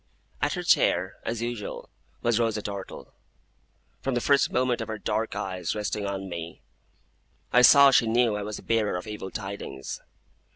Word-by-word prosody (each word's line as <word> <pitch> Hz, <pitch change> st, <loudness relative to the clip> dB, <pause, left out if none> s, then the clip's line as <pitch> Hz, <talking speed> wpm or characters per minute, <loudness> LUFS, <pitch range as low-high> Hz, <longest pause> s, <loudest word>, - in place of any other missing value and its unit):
At -, -, +1 dB
her -, -, -3 dB
chair, -, -, +2 dB
as 115 Hz, 0 st, -2 dB
usual, 120 Hz, -3 st, -5 dB, 0.4 s
was 120 Hz, -1 st, +2 dB
Rosa 115 Hz, -2 st, 0 dB
Dartle. 100 Hz, -2 st, -7 dB, 0.9 s
From 135 Hz, -2 st, -1 dB
the -, -, +2 dB
first 140 Hz, +3 st, +3 dB
moment 125 Hz, -1 st, +1 dB
of 110 Hz, -, -4 dB
her 110 Hz, -1 st, -4 dB
dark 110 Hz, +1 st, -2 dB
eyes 95 Hz, -3 st, -3 dB
resting 105 Hz, -1 st, -2 dB
on 95 Hz, -1 st, -4 dB
me, 85 Hz, -2 st, -7 dB, 0.9 s
I 125 Hz, -, +7 dB
saw 140 Hz, +2 st, +8 dB
she 120 Hz, -, +4 dB
knew 115 Hz, -1 st, +3 dB
I 105 Hz, -, -3 dB
was 105 Hz, 0 st, -5 dB
the -, -, -11 dB
bearer 110 Hz, -4 st, +1 dB
of 90 Hz, -, -7 dB
evil 105 Hz, -3 st, -6 dB
tidings. 95 Hz, -9 st, -6 dB
110 Hz, 170 wpm, -26 LUFS, 100-120 Hz, 0.9 s, saw